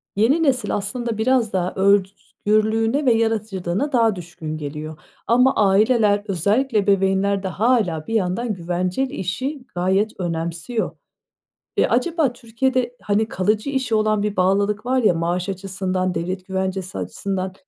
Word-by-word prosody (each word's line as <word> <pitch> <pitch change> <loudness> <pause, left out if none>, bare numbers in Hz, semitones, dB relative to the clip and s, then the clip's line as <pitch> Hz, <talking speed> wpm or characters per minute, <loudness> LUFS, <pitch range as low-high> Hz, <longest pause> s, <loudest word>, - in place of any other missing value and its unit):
yeni 265 +11 +3
nesil 255 -7 +1
aslında 230 +2 -3
biraz 235 -2 +1
daha 180 -1 0
özgürlüğüne 215 +5 +1
ve 245 - +5
yaratıcılığına 220 +1 -1
daha 230 -5 +3
düşkün 165 -3 -7
geliyor 150 +1 -6 0.3
ama 250 +3 +4
aileler, 205 0 +3
özellikle 215 - +1
ebeveynler 195 0 +2
de - - -1
hâlâ 195 -6 +1
bir 225 - -4
yandan 215 +2 0
güvenceli 180 +9 -2
işi 260 - -3
gayet 190 +5 0
önemsiyor. 170 +5 -2 0.9
Eee, - - +4
acaba 320 -7 +1
Türkiye'de, 245 +1 -1
hani, 210 +1 +1
kalıcı 215 +4 0
işe 260 -5 0
olan 215 -1 +2
bir 210 -1 -2
bağlılık 200 +4 +1
var 255 0 +1
ya 210 - +5
maaş 175 +3 -1
açısından, 190 -1 -2
devlet 185 +2 -3
güvencesi 190 - -3
açısından, 185 - -3
205 Hz, 130 wpm, -21 LUFS, 185-230 Hz, 0.9 s, ve